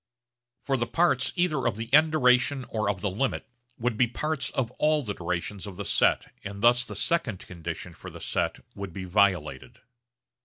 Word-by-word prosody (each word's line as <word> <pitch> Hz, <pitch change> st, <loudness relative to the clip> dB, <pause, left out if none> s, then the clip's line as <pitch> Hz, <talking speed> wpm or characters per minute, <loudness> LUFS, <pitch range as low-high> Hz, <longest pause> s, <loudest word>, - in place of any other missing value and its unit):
For 135 Hz, -1 st, 0 dB
the 120 Hz, -1 st, -1 dB
parts 165 Hz, -6 st, +2 dB
either 155 Hz, -8 st, +1 dB
of 120 Hz, -, 0 dB
the 115 Hz, +3 st, -6 dB
end 155 Hz, +2 st, +6 dB
duration 130 Hz, -1 st, +3 dB
or 110 Hz, -2 st, -1 dB
of 95 Hz, -3 st, -2 dB
the 105 Hz, -, 0 dB
limit 130 Hz, +8 st, -2 dB, 0.3 s
would 120 Hz, -1 st, -1 dB
be 120 Hz, -, +4 dB
parts 150 Hz, +4 st, -2 dB
of 125 Hz, -3 st, -2 dB
all 150 Hz, -1 st, +3 dB
the 105 Hz, -4 st, -3 dB
durations 90 Hz, +3 st, -4 dB
of 95 Hz, -3 st, -8 dB
the -, -, -5 dB
set -, -, +2 dB
and 100 Hz, 0 st, -7 dB
thus 120 Hz, +1 st, +5 dB
the -, -, -8 dB
second 165 Hz, -, 0 dB
condition 85 Hz, 0 st, -6 dB
for 80 Hz, -, -10 dB
the -, -, -11 dB
set -, -, -2 dB
would 100 Hz, -3 st, -7 dB
be 95 Hz, -, -5 dB
violated. 90 Hz, -8 st, 0 dB
115 Hz, 190 wpm, -27 LUFS, 95-135 Hz, 0.3 s, end